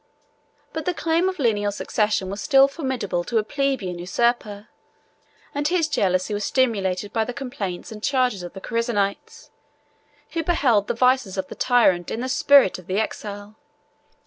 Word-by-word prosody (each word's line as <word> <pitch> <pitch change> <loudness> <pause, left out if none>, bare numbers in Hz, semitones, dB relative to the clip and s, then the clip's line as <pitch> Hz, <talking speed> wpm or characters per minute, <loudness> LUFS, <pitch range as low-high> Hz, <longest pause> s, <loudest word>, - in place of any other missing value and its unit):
But 320 - -4
the 360 - -1
claim 335 +3 +1
of 375 - -6
lineal 210 -6 +1
succession 210 -2 -1
was 200 - -5
still 275 -2 +5
formidable 260 - -3
to 235 - -1
a 215 - +2
plebeian 260 -9 -2
usurper; 210 +2 -1 0.9
and 290 +1 0
his 345 -2 +1
jealousy 185 - 0
was 205 0 -2
stimulated 205 -7 0
by 225 - +1
the 245 +2 -6
complaints 235 -11 -5
and 215 -1 -9
charges 250 -6 +1
of 175 -1 -8
the 195 - -9
Chersonites, 230 -4 -2 0.8
who 335 - -1
beheld 260 - +2
the - - -1
vices 250 -5 +2
of 190 -1 -3
the - - -6
tyrant 210 -9 +3
in 230 - -3
the 255 - -3
spirit 275 -8 +5
of 185 - -15
the 190 +2 0
exile. 210 -1 -5
225 Hz, 165 wpm, -23 LUFS, 200-270 Hz, 0.9 s, still